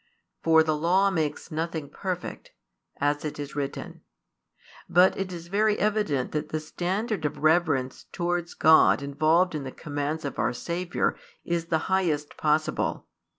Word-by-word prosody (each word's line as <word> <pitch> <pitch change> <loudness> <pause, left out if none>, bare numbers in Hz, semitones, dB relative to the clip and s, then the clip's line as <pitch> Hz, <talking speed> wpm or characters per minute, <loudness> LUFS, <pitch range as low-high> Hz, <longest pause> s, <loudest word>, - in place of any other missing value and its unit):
For 160 -1 +5
the 155 -1 0
Law 185 +6 +3
makes 155 -5 -2
nothing 160 -1 -3
perfect, 180 +4 -5 0.5
as 145 +1 0
it 150 - -4
is 145 -1 -6
written; 140 -1 -5 0.9
but 180 +2 +5
it 190 -1 -3
is 170 -2 -7
very 210 +3 +2
evident 205 -11 0
that 150 - -3
the 155 - -2
standard 185 +5 -2
of 150 0 -2
reverence 155 -5 +2
towards 175 -1 -2
God 160 -2 +5
involved 155 +6 +2
in 150 - -3
the 130 - -6
commands 145 +1 -4
of 140 - -5
our 125 - +1
Saviour 175 +7 -1 0.3
is 170 -1 -1
the 165 - +2
highest 165 -6 0
possible. 155 0 0
160 Hz, 150 wpm, -26 LUFS, 150-180 Hz, 0.9 s, For